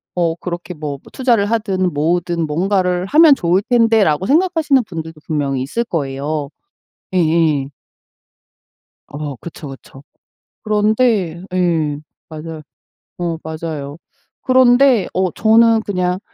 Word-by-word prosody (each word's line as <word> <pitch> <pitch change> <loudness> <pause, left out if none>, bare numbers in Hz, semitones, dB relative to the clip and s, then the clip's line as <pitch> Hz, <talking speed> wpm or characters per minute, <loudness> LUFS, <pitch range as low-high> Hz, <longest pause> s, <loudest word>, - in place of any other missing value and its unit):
어 170 -2 0
그렇게 175 +1 -6
뭐 150 -3 -5
투자를 240 -6 +1
하든 195 -5 0
모으든 170 +2 0
뭔가를 180 +2 0
하면 310 +2 +6
좋을 180 0 +1
텐데.'라고 225 -9 +3
생각하시는 310 -5 +2
분들도 160 -3 -8
분명히 140 -4 -1
있을 230 - -2
거예요. 145 -4 -3 0.7
예예. 160 -5 +1 1.4
어 145 -2 -6
그쵸, 155 -2 -9
그쵸. 135 0 -13 0.6
그런데 210 -5 +1
예. 165 -5 0 0.3
맞아요. 160 0 -8 0.6
어 170 -2 -2
맞아요. 155 -2 -6 0.4
그런데 255 -3 +4
어 185 -1 0
저는 225 0 +4
그냥 180 -2 -1
175 Hz, 240 characters per minute, -17 LUFS, 155-220 Hz, 1.4 s, 하면